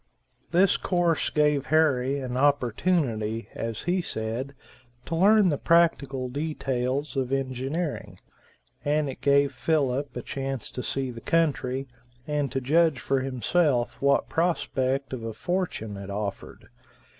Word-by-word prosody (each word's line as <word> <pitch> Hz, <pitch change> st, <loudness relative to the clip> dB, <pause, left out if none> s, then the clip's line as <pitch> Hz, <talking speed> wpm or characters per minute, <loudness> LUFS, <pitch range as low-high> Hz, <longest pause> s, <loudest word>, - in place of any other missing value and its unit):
This 180 Hz, +2 st, +4 dB
course 175 Hz, -3 st, +1 dB
gave 150 Hz, -2 st, +2 dB
Harry 140 Hz, -4 st, +2 dB
an 125 Hz, -2 st, -4 dB
opportunity, 125 Hz, -4 st, +1 dB
as 115 Hz, -2 st, -4 dB
he 180 Hz, +1 st, +1 dB
said, 120 Hz, 0 st, -4 dB, 0.5 s
to 165 Hz, -, -3 dB
learn 200 Hz, +2 st, +5 dB
the 145 Hz, -, -1 dB
practical 145 Hz, -6 st, +2 dB
details 135 Hz, -1 st, -2 dB
of 130 Hz, -1 st, -1 dB
engineering, 135 Hz, +4 st, -3 dB, 0.6 s
and 150 Hz, 0 st, +1 dB
it 135 Hz, -, -7 dB
gave 140 Hz, 0 st, +3 dB
Philip 135 Hz, -1 st, 0 dB
a 125 Hz, -, -5 dB
chance 135 Hz, -3 st, -4 dB
to 125 Hz, -, -5 dB
see 135 Hz, 0 st, -2 dB
the 115 Hz, -1 st, -9 dB
country, 135 Hz, -5 st, 0 dB, 0.4 s
and 150 Hz, -2 st, -1 dB
to 135 Hz, -, -1 dB
judge 155 Hz, +2 st, +3 dB
for 135 Hz, -1 st, 0 dB
himself 130 Hz, +1 st, 0 dB
what 140 Hz, 0 st, +3 dB
prospect 140 Hz, -5 st, 0 dB
of 125 Hz, -, -4 dB
a 115 Hz, -1 st, -4 dB
fortune 175 Hz, -, -2 dB
it 100 Hz, 0 st, -8 dB
offered. 100 Hz, 0 st, -5 dB
135 Hz, 135 wpm, -26 LUFS, 125-155 Hz, 0.6 s, learn